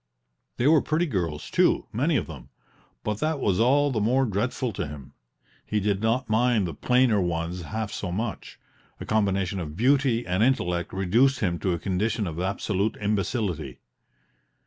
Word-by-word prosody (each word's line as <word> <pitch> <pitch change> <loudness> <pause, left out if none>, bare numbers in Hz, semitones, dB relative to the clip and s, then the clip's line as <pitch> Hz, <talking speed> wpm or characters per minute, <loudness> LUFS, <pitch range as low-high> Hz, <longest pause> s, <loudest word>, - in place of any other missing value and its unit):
They 120 - 0
were 155 0 +6
pretty 155 +3 0
girls, 85 - -3
too, - - +3
many 145 +9 +1
of - - -1
them; 70 -6 -11 0.5
but 105 0 -2
that 155 -1 0
was 95 -7 +1
all 140 +5 +3
the 110 -4 -1
more 130 +5 +2
dreadful 115 +3 -2
to 85 - -3
him: 70 -2 -10 0.5
he 105 - -1
did 100 -1 0
not 115 +4 +1
mind 110 -1 +2
the 85 - -4
plainer 125 - +2
ones 85 0 -2
half 110 +4 -4
so 90 - -4
much; 105 +3 -4 0.4
a - - -6
combination 100 -3 0
of 80 -2 -6
beauty 130 0 +2
and 90 +2 0
intellect 90 -9 +1
reduced 115 +8 +2
him 85 -5 0
to 95 - 0
a - - -1
condition 100 +5 -1
of 85 -2 -5
absolute 100 +2 -1
imbecility. 105 - -2
105 Hz, 170 wpm, -26 LUFS, 90-125 Hz, 0.5 s, were